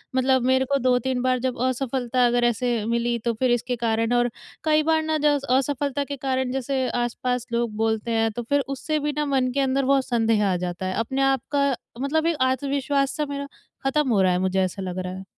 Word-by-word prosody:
मतलब 260 0 +3
मेरे 260 0 +3
को 280 - +4
2-3 250 0 +1
बार 255 0 +1
जब 255 0 -2
असफ़लता 255 -1 0
अगर 240 0 +1
ऐसे 240 +1 +1
मिली 235 +1 0
तो 235 - +1
फ़िर 245 +2 +1
इसके 245 +1 0
कारण 230 0 0
और 245 0 +3 0.3
कई 310 -1 +3
बार 320 0 +2
ना 315 0 0
ज 295 -1 +4
असफलता 280 +1 +1
के 280 0 -5
कारण 260 -1 -1
जैसे 265 0 -1
आस-पास 245 +1 -2
लोग 235 -2 -1
बोलते 220 +1 0
हैं 225 -1 +1
तो 240 +3 -5
फ़िर 285 +5 +1
उससे 300 +3 -2
भी 295 0 -1
ना 300 - +1
मन 265 -3 +1
के 280 - 0
अंदर 270 0 +1
बहुत 270 -1 +3
संदेह 225 -3 +2
आ - - +1
जाता 175 +1 -4
है। 185 - -2
अपने 265 +4 -1
आप 270 -2 +2
का 280 -2 +2 0.3
मतलब 315 +3 0
एक 335 -3 +1
आत्मविश्वास 275 +1 0
सा 300 - 0
मेरा 280 0 -4 0.4
ख़त्म 275 0 +1
हो 205 -4 +3
रहा 185 -1 +4
है 180 - +1
मुझे 190 +1 +1
ऐसा 185 +1 -3
लग 185 -1 -4
रहा 185 0 -4
है। 190 +1 -7
255 Hz, 220 wpm, -24 LUFS, 235-275 Hz, 0.4 s, को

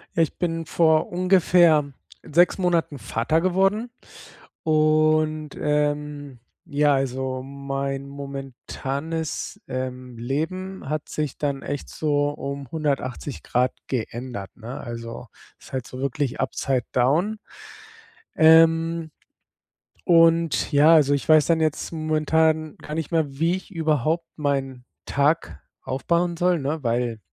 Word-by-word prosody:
Ja, 165 - +3
ich 160 - 0
bin 165 -2 -2
vor 160 -1 +3
ungefähr 175 -4 +4 0.3
6 175 +5 +2
Monaten 170 -5 0
Vater 120 +8 0
geworden 195 +6 +1 0.7
und, 155 -1 +2
ähm, 150 -2 -1 0.3
ja, 145 0 +2
also 130 -1 -2
mein 140 0 -4
momentanes, 140 +3 -5
ähm, 130 -1 -5
Leben 160 +9 -4
hat 155 0 -3
sich 150 -3 -3
dann 140 -2 -2
echt 140 0 -5
so 145 -2 0
um 140 -2 -6
180 145 -3 -3
Grad 125 +1 +1
geändert, 120 -4 -4
ne? 120 +4 -8
Also 115 0 -7 0.3
ist - - -16
halt 130 -2 -3
so 130 - -9
wirklich 135 -1 -2
upside 130 -1 -1
down 165 - +2 1.0
Ähm. 165 0 +5 0.9
Und 165 -2 +4
ja, 150 +3 +6
also 145 -3 +5
ich 140 - -2
weiß 155 -2 +6
dann 165 -1 +3
jetzt 155 -1 -1
momentan 155 0 +1
gar 150 - -7
nicht 160 -2 -3
mehr, 165 -2 +2
wie 165 +2 +2
ich 190 - -13
überhaupt 160 -1 0
meinen 135 -4 -2 0.2
Tag 145 +4 0 0.2
aufbauen 170 +6 0
soll, 175 0 +2
ne? 150 +3 -2
Weil 120 -2 -1
150 Hz, 120 wpm, -24 LUFS, 135-165 Hz, 1.0 s, ja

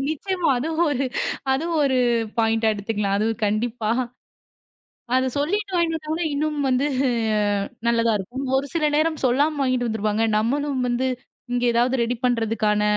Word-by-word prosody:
நிச்சயமா 355 +3 -1
அது 290 +6 -2 0.2
ஒரு 275 -2 0 0.5
அது 270 +4 0 0.2
ஒரு 270 -2 +2 0.4
பாய்ண்ட்டா 225 0 +2
எடுத்துக்கலாம். 205 -1 -2
அது 215 - +1 0.2
கண்டிப்பா. 220 +1 -1 1.2
அதைச் 260 -1 +1
சொல்லிட்டு 395 +7 -1
வாங்கி 335 -1 +1
வந்தா 320 +2 -3
இன்னும் 300 +1 -1
வந்து 260 +3 +2 1.0
நல்லா 230 -1 +3
இருக்கும். 245 +8 -5
ஒரு 275 - 0
சில 325 - +1
நேரம் 315 0 0
சொல்லாம 285 +5 +2
வாங்கிட்டு 255 -2 +1
வந்துருப்பாங்க. 220 0 0
நம்மளும் 275 +4 0
வந்து 245 +2 0 0.5
இங்க 245 0 0
எதாவது 240 +2 +2
ரெடி 240 +1 -1
பண்றதுக்கான 225 -3 +1
255 Hz, 135 wpm, -23 LUFS, 225-295 Hz, 1.2 s, நல்லா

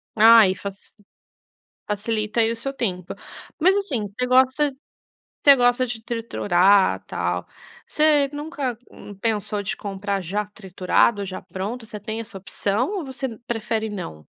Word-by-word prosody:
Ah, 225 +1 +8
aí 190 -3 +5
fac 200 0 -6 1.1
facilita 215 +1 -1
aí 225 0 +3
o - - -5
seu 275 +4 -4
tempo. 185 -9 -3 0.5
Mas, 375 +4 +5
assim, 270 - -1
você 250 0 0
gosta 260 +3 +3 0.7
você 280 -1 +9
gosta 245 0 +3
de 225 -2 -5
triturar, 200 -5 +2
tal. - - -2 0.4
Você 300 -2 +3
nunca, 290 -5 -4
hum, 205 - -11
pensou 210 -1 -1
de 195 - -3
comprar 200 0 -3
já 200 +4 -2
triturado 200 +1 +1
ou - - -3
já 185 0 -6
pronto? 200 +6 -5
Você 215 -1 -8
tem 220 +2 -5
essa 210 -3 -8
opção 210 - -2
ou 310 - -6
você 265 0 -4 0.2
prefere 220 -1 -2
não? 80 - -7
220 Hz, 150 wpm, -23 LUFS, 200-255 Hz, 1.1 s, você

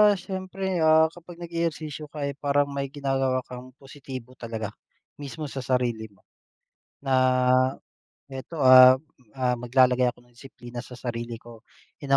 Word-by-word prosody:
siyempre, 190 0 -4
ah, 160 0 +5
kapag 175 0 -13
nag-e-ehersisyo 165 -3 -4
ka, 150 0 -7
eh, 140 - -1
parang 145 0 +1
may 140 0 -3
ginagawa 135 -2 -1
kang 125 0 -11
positibo 135 -2 -10
talaga, 115 -4 -6 0.5
mismo 145 +2 -7
sa 135 - -5
sarili 120 -4 -1
mo, 100 -3 -28 0.8
na 135 -1 -1 1.2
eto, 135 +5 -8
ah, 130 -2 +8 0.4
ah, 125 -1 +1
maglalagay 125 0 +3
ako 120 0 -8
ng 120 - -27
disiplina 120 -1 -10
sa 125 +1 -11
sarili 120 -1 -5
ko, 115 -1 -14 0.4
in 135 -1 +2
135 Hz, 140 wpm, -25 LUFS, 125-150 Hz, 1.2 s, ah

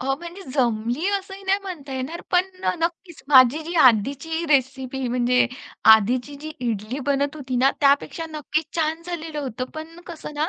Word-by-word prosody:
अ, 270 +1 0
म्हणजे 345 +3 -9
जमली 240 - 0
असंही 390 0 -11
नाही 385 +1 +2
म्हणता 305 -8 -7
येणार, 265 +6 -4
पण 365 +1 +2
अ, - - +2
नक्कीच 340 0 -4
माझी 265 +2 +6
जी 340 +2 -5
आधीची 275 +9 +1
रेसिपी 265 -1 0
म्हणजे 250 +1 +2 0.5
आधीची 245 +6 0
जी 310 0 -6 0.2
इडली 215 +5 -3
बनत 280 +2 0
होती 260 -4 -4
ना, 265 +2 +4
त्यापेक्षा 285 +3 +2
नक्कीच 305 0 -3
छान 320 +1 0
झालेलं 330 -3 -5
होतं, 255 -2 -4
पण 325 +2 -9
कसं 320 -3 -8
ना, 310 +3 0
290 Hz, 165 wpm, -23 LUFS, 255-330 Hz, 0.5 s, माझी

